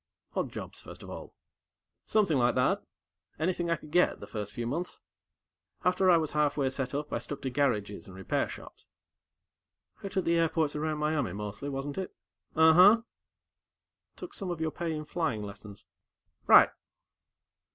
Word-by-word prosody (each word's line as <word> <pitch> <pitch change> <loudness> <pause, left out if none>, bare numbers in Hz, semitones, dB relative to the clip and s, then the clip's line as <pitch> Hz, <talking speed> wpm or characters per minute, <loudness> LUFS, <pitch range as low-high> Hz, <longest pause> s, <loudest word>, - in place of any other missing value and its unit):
"Odd - - -1
jobs, - - -8
first - - -11
of - - -9
all?" - - -9 0.7
"Something 195 -10 +2
like 120 0 +3
that. 125 - +2 0.6
Anything 170 +1 -1
I 170 - +3
could 150 -1 -13
get, 180 +2 +3
the - - -8
first 105 -2 -5
few 120 -2 -4
months. 165 +9 -3 0.9
After 180 +1 +3
I 175 - +7
was 160 -2 -1
halfway 145 -3 +1
set 135 0 -3
up, 150 +1 -3
I - - 0
stuck 135 +4 -6
to 130 - -2
garages 115 -7 -1
and 95 - -11
repair 95 0 -1
shops." - - -11 1.2
"Out 195 0 -5
at 190 - +1
the 170 0 +3
airports 160 -2 +1
around 155 0 -1
Miami, 150 - 0
mostly, 105 +6 -5
wasn't 140 +4 -4
it?" 190 - -5 0.4
"Ahuh." 180 +8 +7 1.1
"Took 365 - -9
some 195 -3 -5
of 175 -2 -3
your 160 -1 -1
pay 170 0 -3
in 155 -1 -4
flying 150 -10 -2
lessons." 100 0 -10 0.6
"Right." - - +8
150 Hz, 160 wpm, -30 LUFS, 125-170 Hz, 1.2 s, Right